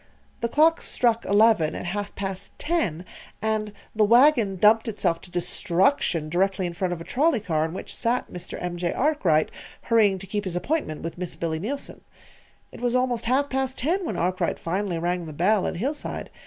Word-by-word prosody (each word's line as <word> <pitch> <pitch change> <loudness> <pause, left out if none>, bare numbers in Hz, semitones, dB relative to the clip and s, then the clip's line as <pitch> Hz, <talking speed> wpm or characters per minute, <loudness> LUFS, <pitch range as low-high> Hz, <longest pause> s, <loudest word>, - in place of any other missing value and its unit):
The 235 - -1
clock 320 +5 +4
struck 235 -2 +1
eleven 205 -5 +4
at - - -5
half 200 +3 -4
past 195 0 -5
ten, 215 - -1 0.3
and 215 -1 -1 0.2
the 215 - +4
wagon 235 -2 +5
dumped 215 +5 +4
itself 180 -6 0
to - - -13
destruction 175 - +1
directly 190 +3 0
in 175 - -3
front 180 +1 -2
of 170 -2 -4
a - - -5
trolley 275 - +2
car 160 -6 0
in 160 - -5
which - - -5
sat 245 +1 0
Mr. 180 - -6
M. 175 0 -4
J. 175 0 -1
Arkwright, 200 - +2 0.3
hurrying 215 -4 +3
to 190 - -8
keep 205 +1 -3
his 180 -2 -3
appointment 180 - -2
with 165 +1 -6
Miss 180 -2 -4
Billy 160 -1 -2
Neilson. 270 - -5 0.7
It - - -11
was 245 0 0
almost 250 -2 0
half 265 +4 +2
past 265 -1 -2
ten 345 +9 0
when 330 - -3
Arkwright 180 0 0
finally 185 +1 -2
rang 175 0 -2
the 155 - -7
bell 190 +6 +2
at - - -3
Hillside. 275 - -4
200 Hz, 190 wpm, -25 LUFS, 175-245 Hz, 0.7 s, wagon